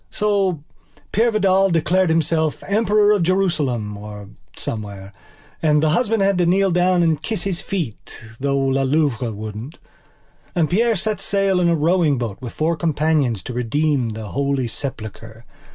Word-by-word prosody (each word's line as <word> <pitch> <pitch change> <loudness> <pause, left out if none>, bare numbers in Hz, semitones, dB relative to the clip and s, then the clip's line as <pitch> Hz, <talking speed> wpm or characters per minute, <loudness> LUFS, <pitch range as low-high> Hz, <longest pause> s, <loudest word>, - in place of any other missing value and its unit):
So 195 -7 0 0.5
Peire 230 +3 +3
Vidal 195 -2 +3
declared 175 +2 +2
himself 160 -1 0
Emperor 210 0 +3
of 205 -3 +3
Jerusalem 155 - 0
or 105 -1 -9 0.3
somewhere 100 -3 -6 0.5
and 150 -1 +3
the 155 - +3
husband 220 +3 +1
had 195 -2 +2
to 175 - +3
kneel 190 +2 +3
down 180 0 +3
and 160 -2 +1
kiss 220 -2 -3
his 190 -3 -2
feet 165 - -5 0.2
though 140 0 0
La 135 0 +1
Louve 140 -3 +1
wouldn't. 110 +4 -6 0.8
And 165 -2 +1
Peire 230 +4 +3
set 210 +1 -2
sail 195 -2 +1
in 175 -1 +3
a 170 - +3
rowing 160 -2 +2
boat 115 -5 -4
with 120 -3 -7
four 165 +2 0
companions 150 - 0
to 125 - -6
redeem 125 +1 0
the 110 -1 -6
Holy 140 -1 -1
Sepulchre. 115 -3 -7
155 Hz, 155 wpm, -20 LUFS, 125-190 Hz, 0.8 s, Peire